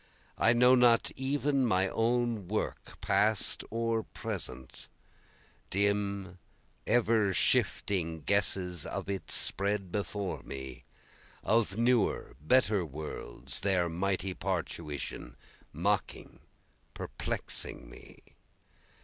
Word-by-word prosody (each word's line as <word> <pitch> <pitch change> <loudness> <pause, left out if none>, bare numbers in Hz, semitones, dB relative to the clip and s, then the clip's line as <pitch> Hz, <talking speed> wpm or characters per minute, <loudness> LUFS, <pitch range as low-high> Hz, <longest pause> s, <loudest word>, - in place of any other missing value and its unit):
I 115 - +5
know 125 +1 +6
not 120 -2 +5
even 140 +1 +1
my 95 -5 +3
own 115 -2 0
work 105 +3 -3
past 110 -1 +2
or 115 0 0
present, 65 -10 -6 0.8
Dim 100 -1 0 0.5
ever 110 -4 +3
shifting 85 -5 +1
guesses 90 -2 +2
of - - -4
it 95 - -5
spread 100 -2 -1
before 100 -1 -3
me, 65 -2 -7 0.6
Of 110 -2 +2
newer 120 -2 +1
better 105 - +3
worlds, 75 -5 -4
their 95 -3 +2
mighty 95 +2 -1
parturition, 75 -9 -4 0.4
Mocking, - - -1 0.6
perplexing - - -5
me. - - -13
100 Hz, 90 wpm, -31 LUFS, 90-115 Hz, 0.8 s, know